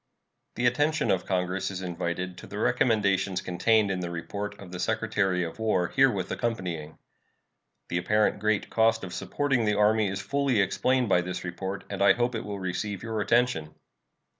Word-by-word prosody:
The 120 - -1
attention 145 +6 +2
of 95 - 0
Congress 90 0 -1
is 95 -1 -5
invited 90 +1 -3
to - - -11
the 100 - -7
recommendations 100 -5 +2
contained 105 +3 +2
in 95 - -2
the 90 -1 -3
report 100 +5 -5
of 90 -3 -11
the 90 - -6
Secretary 105 -5 0
of 85 +5 -6
War 100 -5 +1
herewith 125 -9 +2
accompanying. 90 -10 -3 0.9
The 90 - -1
apparent 105 +3 +2
great 105 0 0
cost 115 -1 +3
of 90 -2 -6
supporting 140 -5 0
the 105 -1 +1
Army 105 0 +3
is 95 0 -3
fully 140 +1 0
explained 125 +6 +2
by 90 -3 +3
this 90 +1 -5
report, 95 +2 -5
and 100 -1 -5
I 100 - +7
hope 120 +1 0
will 105 -3 -4
receive 95 +2 -3
your 110 -2 -2
attention. 115 -10 +1
100 Hz, 170 wpm, -27 LUFS, 90-115 Hz, 0.9 s, I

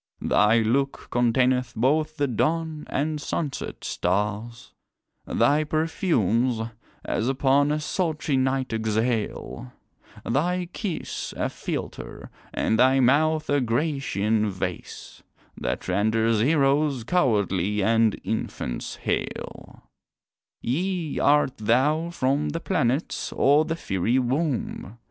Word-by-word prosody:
Thy 110 +2 +4
look 135 +5 -1
containeth 125 +1 +2
both 150 +6 +1
the 145 - +2
dawn 155 +5 -1
and 150 +1 -1
sunset 145 -2 -4
stars, 105 +5 -2 0.5
Thy 150 +2 +3
perfumes, 130 - +1 0.5
as 115 - -1
upon 140 +2 +3
a 150 - 0
sultry 155 -2 -1
night 130 -1 0
exhale, 110 - -2 0.5
Thy 175 +8 0
kiss 195 -7 -4
a - - 0
philter, - - -6 0.2
and 110 - 0
thy 130 +2 +5
mouth 155 +5 +3
a 145 -1 +2
Grecian 115 - 0
vase, 95 -2 -6 0.3
That 60 - -3
renders 110 +4 +2
heroes 140 -1 +2
cowardly 105 - +1
and 115 0 +3
infants - - -4
hale. - - -4 0.8
Yea, 170 +4 -1
art 145 -2 +3
thou 140 +10 +2
from 145 -2 0
the 165 +3 -3
planets, 145 -5 -1
or 145 +3 +4
the 165 0 -2
fiery 115 - 0
womb? 130 - -2
130 Hz, 105 wpm, -25 LUFS, 115-155 Hz, 0.8 s, thy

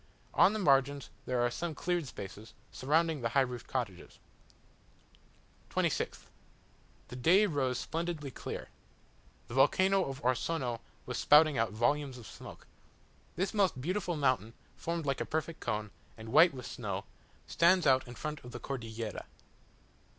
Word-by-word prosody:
On - - +6
the - - -1
margins 140 -5 +2 0.2
there 125 -1 +1
are 120 - +1
some 165 +4 -4
cleared 175 -4 -1
spaces, 105 -1 -9 0.2
surrounding 155 +3 +1
the 115 - 0
high 135 +4 +3
roofed 125 -2 -3
cottages. 115 -9 -4 1.5
26th - - -1 0.9
The - - -7
day 175 +12 +5
rose 135 -8 0
splendidly 165 -4 -3
clear. - - -6 0.8
The - - -9
volcano 190 +8 +4
of 135 0 -5
Orsono 125 -1 0 0.3
was - - -3
spouting 150 -2 +6
out 115 - +1
volumes 130 +4 0
of 120 - -11
smoke. - - -11 0.7
This 190 +2 -1
most 195 -10 +2
beautiful 175 +4 -1
mountain, 130 -6 +1 0.2
formed 170 -1 -3
like 135 -2 -1
a - - +2
perfect 160 +1 -3
cone, 105 -3 -3 0.3
and 110 0 -9
white 170 +9 +7
with 125 -2 -7
snow, 100 -5 -4 0.4
stands 180 +2 +4
out 130 -1 +4
in 120 - -9
front 150 +3 -5
of 120 - -9
the - - -6
Cordillera. 115 -4 -5
135 Hz, 145 wpm, -32 LUFS, 120-165 Hz, 1.5 s, white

